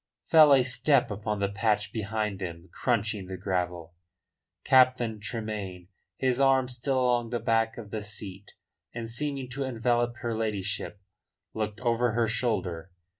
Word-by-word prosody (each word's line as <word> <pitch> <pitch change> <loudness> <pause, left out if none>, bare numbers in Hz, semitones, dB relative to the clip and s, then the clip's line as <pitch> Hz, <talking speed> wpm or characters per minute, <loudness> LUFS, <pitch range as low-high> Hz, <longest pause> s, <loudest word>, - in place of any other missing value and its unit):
Fell 155 -3 +7
a 135 -2 +6
step 125 0 +2
upon 105 +1 -3
the 100 - +1
patch 105 0 0
behind 105 -2 -2
them 85 -1 -6
crunching 105 -5 -1
the 95 0 -6
gravel. 90 -3 -3 0.7
Captain 125 -4 +4
Tremayne, 100 -4 -5 0.3
his 130 -1 +1
arm 135 -1 +4
still 130 +2 -1
along 120 -2 +1
the 120 0 -1
back 115 0 +1
of 105 -3 -9
the 110 - -3
seat, 100 -1 -7 0.4
and 115 -1 -4
seeming 135 +3 -3
to 135 +2 -3
envelop 120 -1 0
her 115 -1 -1
ladyship, 105 -2 -3 0.5
looked 110 0 -3
over 120 -1 +1
her 115 0 +2
shoulder. 95 -7 -1
110 Hz, 145 wpm, -28 LUFS, 100-125 Hz, 0.7 s, Fell